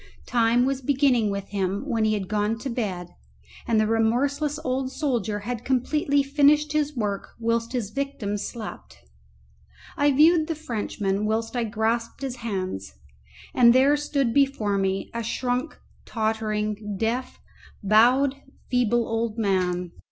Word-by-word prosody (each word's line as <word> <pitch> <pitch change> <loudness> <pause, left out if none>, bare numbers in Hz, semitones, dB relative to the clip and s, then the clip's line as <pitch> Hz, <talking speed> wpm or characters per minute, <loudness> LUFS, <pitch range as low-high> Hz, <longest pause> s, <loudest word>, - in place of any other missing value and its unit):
Time 240 +1 +3
was 270 0 -1
beginning 260 -5 +2
with 200 -1 -4
him 195 +1 -2
when 230 -5 +1
he 215 0 +2
had 195 -3 -4
gone 210 +2 0
to 265 +3 -5
bed, 190 -7 -3 0.6
and 225 -2 +3
the 215 - +3
remorseless 270 +7 +1
old 260 0 -1
soldier 235 -9 -1
had 235 +2 -4
completely 280 +3 +1
finished 295 +2 +3
his 300 -1 0
work 205 -3 -3
whilst 230 +1 -1
his 230 -5 -2
victim 275 -7 -3
slept. 215 - -7 1.0
I 290 0 +3
viewed 310 +3 +5
the 325 - -2
Frenchman 210 -7 -2
whilst 225 +2 -1
I 240 -1 0
grasped 230 +3 -2
his 260 -2 -4
hands, 185 - -4 0.6
and 235 -1 +6
there 270 +3 +5
stood 285 -5 -1
before 250 -8 +2
me 195 0 -1
a 235 - -2
shrunk, 250 +5 -2 0.3
tottering, 215 -2 -2
deaf, 235 +5 -2 0.4
bowed, 250 +7 +4 0.3
feeble 240 -2 +2
old 225 0 -2
man. 180 -4 0
230 Hz, 140 wpm, -25 LUFS, 210-270 Hz, 1.0 s, and